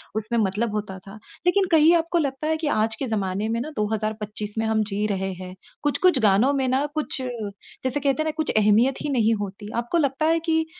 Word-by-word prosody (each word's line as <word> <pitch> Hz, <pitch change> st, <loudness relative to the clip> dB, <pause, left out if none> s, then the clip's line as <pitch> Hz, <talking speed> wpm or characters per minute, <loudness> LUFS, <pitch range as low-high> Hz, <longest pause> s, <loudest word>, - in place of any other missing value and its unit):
उसमें 220 Hz, +2 st, -2 dB
मतलब 210 Hz, +3 st, -1 dB
होता 200 Hz, -2 st, -4 dB
था। 195 Hz, -, -9 dB, 0.3 s
लेकिन 380 Hz, +2 st, +3 dB
कहीं 320 Hz, +1 st, +6 dB
आपको 335 Hz, +1 st, 0 dB
लगता 285 Hz, -1 st, -1 dB
है 315 Hz, 0 st, +1 dB
कि 310 Hz, -2 st, -3 dB
आज 220 Hz, +1 st, +1 dB
के 270 Hz, -, -1 dB
ज़माने 205 Hz, 0 st, -1 dB
में 230 Hz, +1 st, 0 dB
ना 305 Hz, -, -4 dB
2025 210 Hz, -1 st, -3 dB
में 225 Hz, -, 0 dB
हम 220 Hz, -1 st, +2 dB
जी 205 Hz, +1 st, 0 dB
रहे 190 Hz, 0 st, -2 dB
हैं। 185 Hz, 0 st, -9 dB, 0.3 s
कुछ-कुछ 295 Hz, +1 st, +3 dB
गानों 220 Hz, +6 st, +4 dB
में 265 Hz, -2 st, 0 dB
ना 265 Hz, +3 st, +1 dB
कुछ 295 Hz, -3 st, -2 dB
जैसे 245 Hz, +3 st, -5 dB
कहते 285 Hz, +2 st, +1 dB
हैं -, -, -7 dB
ना 315 Hz, -, 0 dB
कुछ 315 Hz, -, 0 dB
अहमियत 215 Hz, +5 st, +3 dB
ही 295 Hz, -, -2 dB
नहीं 230 Hz, -4 st, +2 dB
होती। 205 Hz, +1 st, -6 dB
आपको 335 Hz, +9 st, -1 dB
लगता 285 Hz, 0 st, +1 dB
है 330 Hz, +1 st, +3 dB
कि 320 Hz, 0 st, +2 dB
230 Hz, 215 wpm, -24 LUFS, 210-290 Hz, 0.3 s, कहीं